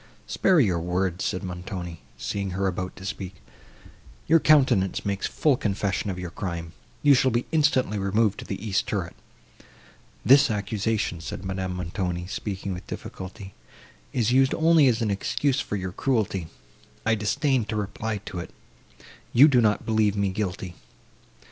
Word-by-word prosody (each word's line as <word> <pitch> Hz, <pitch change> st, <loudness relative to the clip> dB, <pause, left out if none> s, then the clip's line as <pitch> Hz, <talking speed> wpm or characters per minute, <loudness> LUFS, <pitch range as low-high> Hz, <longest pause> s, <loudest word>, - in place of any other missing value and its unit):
"Spare 185 Hz, -3 st, +3 dB
your 95 Hz, -, +3 dB
words," 90 Hz, +1 st, -1 dB
said 90 Hz, -, -2 dB
Montoni, 90 Hz, -2 st, -6 dB, 0.2 s
seeing 100 Hz, -1 st, -3 dB
her 100 Hz, -, 0 dB
about 95 Hz, 0 st, -2 dB
to 95 Hz, -, -10 dB
speak, 95 Hz, -2 st, -5 dB, 0.9 s
"your 165 Hz, +1 st, +5 dB
countenance 130 Hz, -12 st, +3 dB
makes 100 Hz, -1 st, -1 dB
full 150 Hz, -4 st, +2 dB
confession 100 Hz, -3 st, -1 dB
of 95 Hz, -, -3 dB
your 90 Hz, -2 st, -5 dB
crime.—You 85 Hz, -, -1 dB
shall 130 Hz, 0 st, +4 dB
be 120 Hz, 0 st, 0 dB
instantly 140 Hz, -9 st, +2 dB
removed 100 Hz, +1 st, +1 dB
to -, -, -7 dB
the 100 Hz, +2 st, -5 dB
east 100 Hz, -2 st, 0 dB
turret." -, -, -2 dB, 1.1 s
"This 140 Hz, +2 st, +7 dB
accusation," 105 Hz, -3 st, -1 dB
said 95 Hz, -, -6 dB
Madame 95 Hz, -1 st, -3 dB
Montoni, 90 Hz, 0 st, -3 dB
speaking 95 Hz, 0 st, -4 dB
with 90 Hz, -, -8 dB
difficulty, 95 Hz, +1 st, -8 dB, 0.6 s
"is 120 Hz, -2 st, +1 dB
used 130 Hz, +1 st, +4 dB
only 160 Hz, -3 st, +5 dB
as 120 Hz, -2 st, +2 dB
an 105 Hz, -, 0 dB
excuse 135 Hz, +7 st, 0 dB
for -, -, -3 dB
your 95 Hz, -2 st, -3 dB
cruelty; 100 Hz, -, -1 dB, 0.6 s
I 115 Hz, -, +3 dB
disdain 110 Hz, +4 st, +1 dB
to 110 Hz, -, -4 dB
reply 105 Hz, 0 st, -3 dB
to 90 Hz, -, -5 dB
it. 85 Hz, -, -6 dB, 0.8 s
You 135 Hz, +5 st, +8 dB
do 130 Hz, -5 st, +4 dB
not 105 Hz, -2 st, +2 dB
believe 110 Hz, -2 st, +2 dB
me 100 Hz, -1 st, +1 dB
guilty." 95 Hz, -2 st, -3 dB
100 Hz, 155 wpm, -25 LUFS, 95-120 Hz, 1.1 s, You